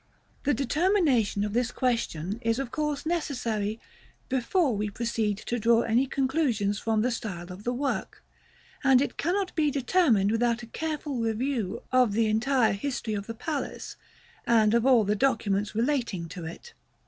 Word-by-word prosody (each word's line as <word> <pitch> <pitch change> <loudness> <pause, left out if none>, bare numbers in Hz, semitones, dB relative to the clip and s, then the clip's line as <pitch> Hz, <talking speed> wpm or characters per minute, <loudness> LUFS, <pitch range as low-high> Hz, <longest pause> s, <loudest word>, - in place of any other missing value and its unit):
The 290 - +3
determination 280 - +2
of 210 0 -3
this 240 0 +1
question 225 -7 -1
is 230 0 +1
of 270 -2 -4
course 300 -2 -2
necessary 235 -10 -2 0.5
before 265 - +1
we 210 +1 -1
proceed 220 -1 -1
to 240 - -1
draw 230 +1 +4
any 240 +4 +2
conclusions 260 -8 0
from 220 -1 +1
the 250 - +1
style 185 -6 -5
of 195 +3 -12
the 245 - +1
work; 270 +3 -3 0.6
and 265 -2 +6
it 280 - -1
cannot 375 +4 -1
be 305 -2 +2
determined 260 - +2
without 235 +1 +1
a 230 - -13
careful 305 -3 -3
review 230 -2 -2
of 250 -5 +4
the 225 +2 +2
entire 225 +2 +2
history 225 +1 -3
of 205 -1 -4
the 230 - -5
palace, 290 +5 -4 0.5
and 220 -2 +4
of 235 +2 +3
all 250 -4 +6
the 205 +1 +1
documents 210 -5 0
relating 230 -8 0
to 175 -1 -7
it. 175 - -9
235 Hz, 160 wpm, -27 LUFS, 215-275 Hz, 0.6 s, and